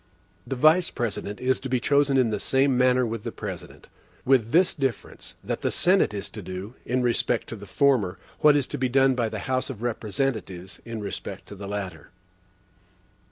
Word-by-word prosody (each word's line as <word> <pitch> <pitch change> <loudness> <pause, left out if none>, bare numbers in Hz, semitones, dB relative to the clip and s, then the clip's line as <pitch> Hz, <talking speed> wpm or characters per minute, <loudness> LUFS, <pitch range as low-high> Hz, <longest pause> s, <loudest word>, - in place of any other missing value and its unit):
The 135 - -2
Vice 155 +7 +5
President 105 -3 -4
is 130 0 +1
to 135 - -6
be 125 0 +1
chosen 140 +1 +3
in 125 -4 +3
the 105 - -1
same 135 +3 +2
manner 125 0 +3
with 115 -2 -4
the - - -4
President; - - -8 0.4
with 125 -4 +3
this 175 +7 +4
difference, 135 -6 -4
that - - -3
the - - +1
Senate 185 +2 +3
is 100 -2 -4
to 105 - -8
do, 95 +4 -7
in 125 +1 +1
respect 120 -1 +1
to - - -5
the 100 -1 -11
former, 115 -4 +2 0.2
what 150 -1 +6
is 145 -3 +2
to - - -2
be 130 -1 +1
done 135 +1 +4
by 120 -3 0
the - - -5
House 130 +1 0
of 120 -4 -7
Representatives, 110 -5 -3
in 115 -2 -5
respect 100 -1 -6
to 100 - -8
the 100 0 -8
latter. 95 -6 -5
120 Hz, 195 wpm, -25 LUFS, 105-135 Hz, 0.4 s, what